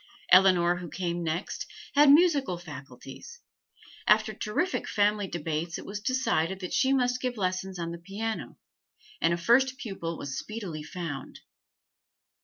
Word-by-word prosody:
Eleanor 180 Hz, -2 st, +6 dB
who 175 Hz, -2 st, -7 dB
came 175 Hz, 0 st, -3 dB
next, 165 Hz, +3 st, -3 dB, 0.3 s
had 290 Hz, 0 st, +6 dB
musical 290 Hz, -, +4 dB
faculties; 140 Hz, -, -10 dB, 0.7 s
after 215 Hz, 0 st, +4 dB
terrific 345 Hz, -, -2 dB
family 205 Hz, -1 st, +2 dB
debates 165 Hz, 0 st, -3 dB
it -, -, -9 dB
was 205 Hz, +1 st, -5 dB
decided 190 Hz, -7 st, 0 dB
that 180 Hz, -2 st, -5 dB
she 265 Hz, -, +3 dB
must 250 Hz, -2 st, +1 dB
give 250 Hz, -2 st, -2 dB
lessons 185 Hz, -1 st, -2 dB
on 170 Hz, -1 st, -3 dB
the 170 Hz, -, -7 dB
piano, 205 Hz, +5 st, -5 dB, 0.6 s
and 165 Hz, -, +3 dB
a 170 Hz, -, +1 dB
first 255 Hz, +8 st, +3 dB
pupil 180 Hz, -9 st, -5 dB
was 135 Hz, -1 st, -5 dB
speedily 200 Hz, -8 st, -6 dB
found. 150 Hz, -4 st, -6 dB
190 Hz, 140 wpm, -28 LUFS, 170-230 Hz, 0.7 s, Eleanor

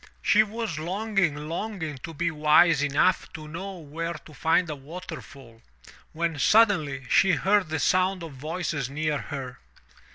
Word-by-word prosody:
She 215 Hz, -, +5 dB
was 215 Hz, -6 st, -3 dB
longing, 190 Hz, -1 st, 0 dB
longing 165 Hz, -4 st, -4 dB
to 165 Hz, -, -7 dB
be 170 Hz, +2 st, -1 dB
wise 155 Hz, 0 st, +4 dB
enough 145 Hz, +6 st, +2 dB
to 155 Hz, -3 st, -8 dB
know 190 Hz, +5 st, -6 dB
where 165 Hz, +2 st, -5 dB
to 155 Hz, 0 st, -13 dB
find 165 Hz, +4 st, +2 dB
a 150 Hz, -, -4 dB
waterfall, 140 Hz, -6 st, -10 dB, 0.5 s
when 165 Hz, -2 st, -2 dB
suddenly 155 Hz, -, +3 dB
she 190 Hz, +9 st, +4 dB
heard 190 Hz, +4 st, +2 dB
the 160 Hz, -, -1 dB
sound 185 Hz, +3 st, +1 dB
of 160 Hz, -3 st, -8 dB
voices 155 Hz, -1 st, -3 dB
near 150 Hz, +1 st, -1 dB
her. 135 Hz, -4 st, -7 dB
160 Hz, 150 wpm, -26 LUFS, 145-185 Hz, 0.5 s, She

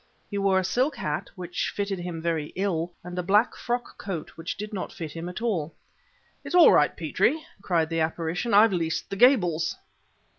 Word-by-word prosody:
He 200 Hz, -, -2 dB
wore 195 Hz, -1 st, +3 dB
a 190 Hz, -, +2 dB
silk 255 Hz, -, +1 dB
hat, 150 Hz, -, -3 dB
which 180 Hz, -1 st, -3 dB
fitted 200 Hz, -2 st, -2 dB
him 175 Hz, -2 st, -5 dB
very 165 Hz, -3 st, -1 dB
ill, 180 Hz, -3 st, -1 dB
and 180 Hz, +1 st, -5 dB
a -, -, +2 dB
black 205 Hz, +6 st, +3 dB
frock 240 Hz, 0 st, -4 dB
coat 180 Hz, -6 st, -5 dB
which 165 Hz, +1 st, -6 dB
did 210 Hz, +2 st, -6 dB
not 190 Hz, -, -4 dB
fit 160 Hz, -3 st, -6 dB
him 165 Hz, +2 st, -6 dB
at 180 Hz, +5 st, -6 dB
all. 170 Hz, -9 st, -1 dB, 0.7 s
"It's -, -, -4 dB
all 355 Hz, -, +9 dB
right, -, -, +3 dB
Petrie!" 315 Hz, +1 st, +1 dB, 0.2 s
cried 170 Hz, -5 st, +1 dB
the 165 Hz, -, 0 dB
apparition; 165 Hz, +7 st, -1 dB
"I've 210 Hz, +1 st, +6 dB
leased 165 Hz, -2 st, -2 dB
the -, -, -2 dB
Gables!" 190 Hz, -, +3 dB
180 Hz, 190 wpm, -26 LUFS, 165-205 Hz, 0.7 s, all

